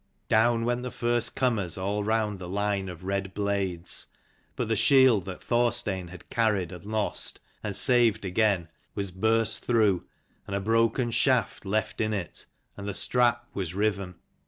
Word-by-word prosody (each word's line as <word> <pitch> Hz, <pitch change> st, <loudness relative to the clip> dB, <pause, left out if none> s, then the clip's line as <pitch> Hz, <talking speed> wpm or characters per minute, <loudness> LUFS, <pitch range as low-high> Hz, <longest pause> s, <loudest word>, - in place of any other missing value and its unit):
Down 115 Hz, +1 st, +3 dB
went 120 Hz, +1 st, 0 dB
the 125 Hz, -, -4 dB
first 120 Hz, -1 st, -1 dB
comers 105 Hz, -10 st, 0 dB
all 100 Hz, +2 st, -1 dB
round 105 Hz, -2 st, 0 dB
the 90 Hz, -1 st, -7 dB
line 100 Hz, 0 st, -1 dB
of 90 Hz, 0 st, -9 dB
red 95 Hz, 0 st, -3 dB
blades: 100 Hz, -4 st, -1 dB, 0.5 s
but -, -, -2 dB
the 110 Hz, -, +1 dB
shield 115 Hz, -2 st, +5 dB
that 95 Hz, -2 st, -7 dB
Thorstein 120 Hz, -6 st, 0 dB
had 90 Hz, 0 st, -12 dB
carried, 105 Hz, -7 st, +1 dB
and 90 Hz, 0 st, -9 dB
lost, 110 Hz, -1 st, -2 dB, 0.2 s
and 105 Hz, -2 st, -4 dB
saved 120 Hz, -5 st, +4 dB
again, 95 Hz, -2 st, +1 dB, 0.3 s
was 100 Hz, -2 st, -2 dB
burst 110 Hz, +3 st, +1 dB
through, 110 Hz, -7 st, +2 dB, 0.4 s
and 100 Hz, -, -3 dB
a -, -, 0 dB
broken 115 Hz, +3 st, +1 dB
shaft 120 Hz, -3 st, +1 dB
left 110 Hz, +2 st, -1 dB
in 110 Hz, -1 st, 0 dB
it, 90 Hz, -5 st, -4 dB, 0.3 s
and 100 Hz, 0 st, -7 dB
the 100 Hz, -, -3 dB
strap 120 Hz, +1 st, +2 dB
was 90 Hz, -3 st, -4 dB
riven. 100 Hz, -3 st, -1 dB
105 Hz, 160 wpm, -27 LUFS, 95-115 Hz, 0.5 s, shield